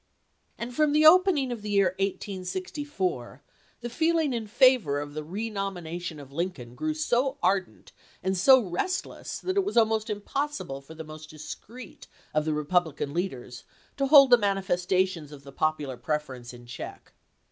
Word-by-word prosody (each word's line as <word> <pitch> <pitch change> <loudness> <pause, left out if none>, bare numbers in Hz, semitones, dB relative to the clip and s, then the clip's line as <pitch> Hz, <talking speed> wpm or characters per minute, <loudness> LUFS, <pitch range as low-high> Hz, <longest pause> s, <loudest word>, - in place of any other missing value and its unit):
And 235 +1 -5
from 305 -1 +3
the 305 +1 +4
opening 320 -5 +6
of 235 -3 -5
the 210 - -6
year 200 -2 +3
1864 195 - -3 0.4
the 240 - -4
feel 330 +5 +2
ing 305 -5 +1
in 225 -2 -3
favor 215 - +4
of 145 0 -6
the 155 0 -4
renomination 180 -4 -4
of 140 -1 -12
Lincoln 145 -7 -4
grew 310 - -2
so 270 -2 0
ardent 190 0 -1 0.3
and 190 +1 0
so 260 +9 +7
restless 365 - -3
that 375 +1 -3
it 395 - +4
was 400 -9 -3
almost 220 -1 +3
impos 275 +8 -3
sible 135 0 -7
for 160 +4 -12
the 160 - -7
most 155 0 -11
discreet 210 +9 -10 0.3
of 155 0 +1
the 155 - 0
Republican 150 -2 0
leaders 130 -9 -4 0.3
to 275 -1 +1
hold 275 -2 +8
the 245 - +8
manifestations 185 -4 0
of 145 -2 -11
the 140 - -11
popular 150 -3 -1
prefer 150 +3 -2
ence 120 -1 -10
in 120 -1 -13
check. 120 - -9
190 Hz, 170 wpm, -27 LUFS, 155-255 Hz, 0.4 s, hold